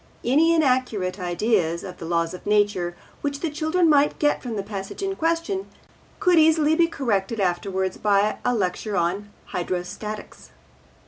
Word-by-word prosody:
Any 315 +7 +4
inaccurate 250 - +1
ideas 175 -2 0
of 180 - -8
the 165 - -6
laws 170 0 0
of 180 - -9
nature 205 -4 +1 0.3
which 285 -1 -3
the 330 - -1
children 315 +3 +1
might 295 -1 +4
get 295 -1 +1
from 240 -3 -5
the 200 - -2
passage 195 - -6
in 390 0 -1
question 335 +3 -1 0.5
could 360 -4 +4
easily 315 -1 +4
be 335 +1 +4
corrected 230 -8 -1
afterwards 190 0 -1
by 205 0 +2
a 245 0 +1
lecture 200 0 -1
on 185 +4 -1 0.2
Hydrostatics. 180 +4 -5
215 Hz, 150 wpm, -24 LUFS, 185-310 Hz, 0.5 s, Any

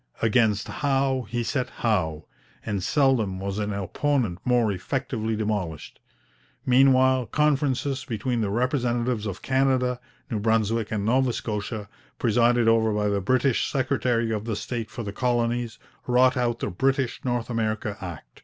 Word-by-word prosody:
Against 110 -2 +2
Howe 135 -3 0
he 120 0 -1
set 125 +1 -1
Howe, 80 -9 -1 0.4
and 105 -3 -2
seldom 120 - +2
was 100 +1 -3
an 105 0 -2
opponent 100 +1 -1
more 120 -4 +2
effectively 110 +2 -2
demolished. 105 -8 -3 0.7
Meanwhile 130 -1 +4
conferences 140 -1 +1
between 120 +1 -2
the 105 - 0
representatives 120 -1 0
of 95 - -6
Canada, 130 -2 +1 0.3
New 110 - -1
Brunswick, 110 0 +1
and 105 -2 -1
Nova 130 +3 +2
Scotia, 105 -1 -4 0.3
presided 120 0 +3
over 115 -1 +4
by 105 0 0
the 100 -1 0
British 130 +5 +1
secretary 125 -3 0
of 110 0 -2
state 115 +1 -4
for 120 - -6
the 100 -1 -5
Colonies, 120 -1 0 0.3
wrought 125 +1 +4
out 120 -2 0
the - - -2
British 135 +5 0
North 120 -1 -2
America 110 -2 -1
Act. 80 -10 -9
115 Hz, 140 wpm, -25 LUFS, 105-130 Hz, 0.7 s, Meanwhile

